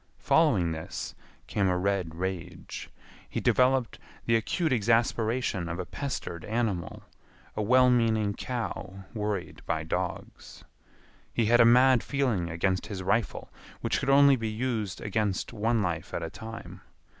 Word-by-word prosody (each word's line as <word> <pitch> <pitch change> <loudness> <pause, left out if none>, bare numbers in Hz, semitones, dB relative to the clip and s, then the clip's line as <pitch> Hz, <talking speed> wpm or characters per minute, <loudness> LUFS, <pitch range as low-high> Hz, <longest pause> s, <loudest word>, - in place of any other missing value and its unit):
Following 115 - +3
this 80 0 -5 0.3
came 100 -2 0
a 90 -1 +2
red 90 -3 -1
rage. 95 0 -5 0.4
He - - -2
developed 130 -2 +2 0.3
the 115 - +3
acute 155 +8 0
exasperation 115 -3 +1
of 85 - -3
a 90 - -4
pestered 110 - -5
animal, 110 -6 -2 0.5
a 105 - -1
well 125 +4 +5
meaning 110 -4 +2
cow 105 -5 -5
worried 105 -4 -3
by 80 -1 -1
dogs. 90 +3 -5 0.7
He 115 - +1
had 120 +2 +5
a - - +7
mad 125 +1 +6
feeling 120 -12 0
against 95 +3 -1
his 95 -3 -5
rifle, 115 +3 -1 0.3
which - - 0
could - - -2
only 140 0 +7
be 115 -3 -3
used 110 -4 -2
against 105 0 -1
one 115 0 +1
life 85 -3 -3
at - - -2
a 80 - -5
time. 115 0 -9
110 Hz, 145 wpm, -28 LUFS, 95-120 Hz, 0.7 s, a